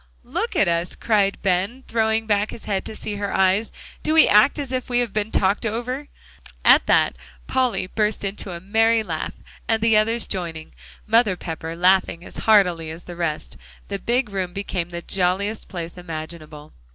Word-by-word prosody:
"Look -, -, -3 dB
at -, -, +3 dB
us," 170 Hz, +1 st, -1 dB
cried 205 Hz, -3 st, +1 dB
Ben, 195 Hz, +7 st, 0 dB
throwing 220 Hz, -1 st, +1 dB
back 210 Hz, 0 st, +1 dB
his 230 Hz, -, -9 dB
head 195 Hz, -2 st, -2 dB
to 220 Hz, -, -7 dB
see 210 Hz, -1 st, -5 dB
her 200 Hz, -1 st, -3 dB
eyes. 190 Hz, +3 st, +2 dB, 0.3 s
"Do 310 Hz, -, 0 dB
we 320 Hz, -, +8 dB
act 210 Hz, +7 st, +5 dB
as 280 Hz, -3 st, -4 dB
if 255 Hz, 0 st, -3 dB
we 245 Hz, -, +1 dB
had 245 Hz, -4 st, 0 dB
been 215 Hz, 0 st, -1 dB
talked 195 Hz, -1 st, +1 dB
over?" 245 Hz, +6 st, -3 dB, 0.6 s
At -, -, +6 dB
that, -, -, +3 dB, 0.3 s
Polly 250 Hz, -8 st, 0 dB
burst 210 Hz, +3 st, -1 dB
into 195 Hz, 0 st, -4 dB
a 170 Hz, -, -6 dB
merry 225 Hz, +4 st, +2 dB
laugh; 165 Hz, -6 st, -4 dB, 0.3 s
and 225 Hz, -1 st, +2 dB
the 225 Hz, -1 st, +4 dB
others 225 Hz, +2 st, +2 dB
joining, 165 Hz, -, -5 dB, 0.3 s
Mother 225 Hz, -3 st, +3 dB
Pepper 165 Hz, -1 st, -6 dB
laughing 180 Hz, -1 st, +2 dB
as -, -, -12 dB
heartily 180 Hz, -7 st, +4 dB
as 160 Hz, +2 st, -8 dB
the 175 Hz, -, -9 dB
rest, 165 Hz, -3 st, -3 dB, 0.3 s
the 200 Hz, -1 st, -3 dB
big 240 Hz, 0 st, 0 dB
room 185 Hz, -2 st, -3 dB
became 190 Hz, -3 st, -3 dB
the 170 Hz, 0 st, -6 dB
jolliest 195 Hz, +3 st, -1 dB
place 170 Hz, -3 st, -6 dB
imaginable. 155 Hz, -3 st, -8 dB
200 Hz, 180 wpm, -22 LUFS, 175-225 Hz, 0.6 s, we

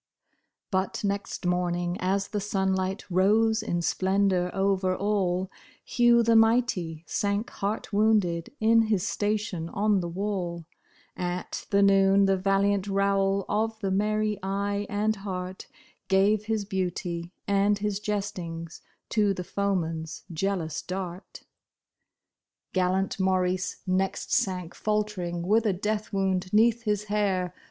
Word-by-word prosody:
But 190 Hz, +1 st, -1 dB
next 200 Hz, -1 st, -3 dB
morning 175 Hz, 0 st, 0 dB
as 195 Hz, +1 st, 0 dB
the 210 Hz, -, -2 dB
sunlight 190 Hz, -1 st, -1 dB
rose 215 Hz, +5 st, +3 dB
in 175 Hz, -6 st, -2 dB
splendor 190 Hz, -1 st, +1 dB
over 190 Hz, -1 st, +1 dB
all, 190 Hz, -2 st, 0 dB, 0.3 s
Hugh 240 Hz, -1 st, +4 dB
the 230 Hz, 0 st, +3 dB
mighty, 225 Hz, -8 st, +2 dB
sank 205 Hz, +5 st, -1 dB
heart 205 Hz, +2 st, -3 dB
wounded 200 Hz, -6 st, +2 dB
in 225 Hz, +1 st, +5 dB
his 205 Hz, -5 st, +1 dB
station 205 Hz, -5 st, -2 dB
on 205 Hz, +1 st, +2 dB
the 175 Hz, -1 st, -3 dB
wall; 175 Hz, -3 st, -3 dB, 0.5 s
At 180 Hz, 0 st, -4 dB
the 200 Hz, 0 st, +4 dB
noon 195 Hz, 0 st, +5 dB
the 195 Hz, 0 st, +3 dB
valiant 195 Hz, +1 st, +1 dB
Raoul 195 Hz, 0 st, +1 dB
of 220 Hz, +1 st, -1 dB
the 195 Hz, -2 st, -1 dB
merry 210 Hz, +1 st, 0 dB
eye 200 Hz, +1 st, -2 dB
and 215 Hz, +1 st, 0 dB
heart, 185 Hz, -2 st, -6 dB, 0.4 s
Gave 200 Hz, +2 st, +3 dB
his 220 Hz, -2 st, -1 dB
beauty 180 Hz, -3 st, -3 dB, 0.2 s
and 200 Hz, +1 st, +3 dB
his 205 Hz, -1 st, -2 dB
jestings 185 Hz, -6 st, -4 dB, 0.3 s
to 205 Hz, -3 st, +2 dB
the 180 Hz, -, -4 dB
foeman's 165 Hz, -5 st, -2 dB
jealous 165 Hz, -3 st, -2 dB
dart. 185 Hz, 0 st, -6 dB, 1.3 s
Gallant 185 Hz, +1 st, 0 dB
Maurice 185 Hz, -1 st, 0 dB
next 190 Hz, 0 st, -1 dB
sank 180 Hz, -3 st, 0 dB
faltering 205 Hz, -5 st, -2 dB
with 215 Hz, +5 st, +2 dB
a 200 Hz, -, +2 dB
death 210 Hz, +3 st, -2 dB
wound 190 Hz, -2 st, 0 dB
'neath 230 Hz, +2 st, +3 dB
his 210 Hz, -1 st, 0 dB
hair. 200 Hz, -4 st, 0 dB
195 Hz, 125 wpm, -27 LUFS, 185-210 Hz, 1.3 s, in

